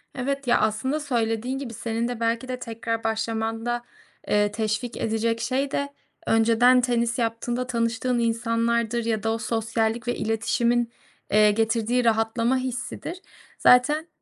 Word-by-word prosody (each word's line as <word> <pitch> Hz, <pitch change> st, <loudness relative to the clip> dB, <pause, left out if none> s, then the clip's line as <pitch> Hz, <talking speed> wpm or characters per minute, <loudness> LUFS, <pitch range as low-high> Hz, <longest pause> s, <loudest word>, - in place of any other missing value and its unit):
Evet. 275 Hz, +1 st, -3 dB
Ya, 240 Hz, -, +4 dB
aslında 220 Hz, +7 st, 0 dB
söylediğin 240 Hz, -2 st, -1 dB
gibi 265 Hz, -4 st, -6 dB
senin 230 Hz, +1 st, -2 dB
de 245 Hz, -2 st, -4 dB
belki 230 Hz, +2 st, 0 dB
de 255 Hz, -1 st, -4 dB
tekrar 230 Hz, -1 st, -4 dB
başlamanda, 225 Hz, +1 st, -2 dB, 0.4 s
eee, 205 Hz, 0 st, +2 dB
teşvik 220 Hz, +3 st, -2 dB
edecek 225 Hz, +1 st, 0 dB
şey 265 Hz, +4 st, -1 dB
de 280 Hz, 0 st, -1 dB, 0.4 s
önceden 230 Hz, +3 st, +5 dB
tenis 240 Hz, -1 st, 0 dB
yaptığında 240 Hz, +2 st, -2 dB
tanıştığın 235 Hz, 0 st, 0 dB
insanlardır 230 Hz, 0 st, 0 dB
ya 220 Hz, -2 st, -1 dB
da 225 Hz, -, +1 dB
o -, -, -1 dB
sosyallik 225 Hz, 0 st, -1 dB
ve 245 Hz, -, 0 dB
iletişimin, 235 Hz, +2 st, 0 dB, 0.4 s
eee, 210 Hz, 0 st, +6 dB
getirdiği 225 Hz, +3 st, +1 dB
rahatlama 230 Hz, +2 st, +2 dB
hissidir. 260 Hz, +7 st, -5 dB, 0.4 s
Zaten, 295 Hz, +6 st, +5 dB
230 Hz, 135 wpm, -25 LUFS, 225-245 Hz, 0.4 s, eee